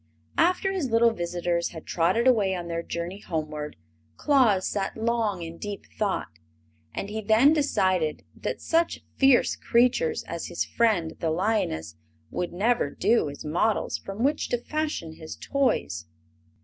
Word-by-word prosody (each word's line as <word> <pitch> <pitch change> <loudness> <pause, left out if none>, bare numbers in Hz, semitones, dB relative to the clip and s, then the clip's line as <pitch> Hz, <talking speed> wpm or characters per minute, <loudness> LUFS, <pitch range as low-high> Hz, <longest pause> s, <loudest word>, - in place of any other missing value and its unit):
After 365 +3 +3
his 355 -9 -1
little 230 0 +4
visitors 175 -3 -1
had 160 -2 -10
trotted 180 +8 +1
away 210 -7 +4
on 175 -1 -5
their 170 0 -2
journey 170 +3 -5
homeward 155 -4 -4 0.4
Claus 245 -10 +3
sat 200 0 -2
long 220 -5 0
in 165 0 -8
deep 205 -1 -6
thought. 190 - -2 0.5
And - - -4
he 220 +1 -3
then 220 +8 +5
decided 185 - +1
that - - -4
such 330 0 +1
fierce 270 -2 +5
creatures 250 - +2
as - - -5
his - - -2
friend 205 -9 +1
the 165 - 0
lioness 160 - -1 0.3
would 175 - -2
never 210 -2 +1
do 225 +2 +2
as 145 - -9
models 175 +8 0
from 195 +4 -5
which 295 +3 +1
to 245 - +1
fashion 270 - -3
his 160 - -8
toys. 250 - -1
205 Hz, 150 wpm, -26 LUFS, 170-240 Hz, 0.5 s, then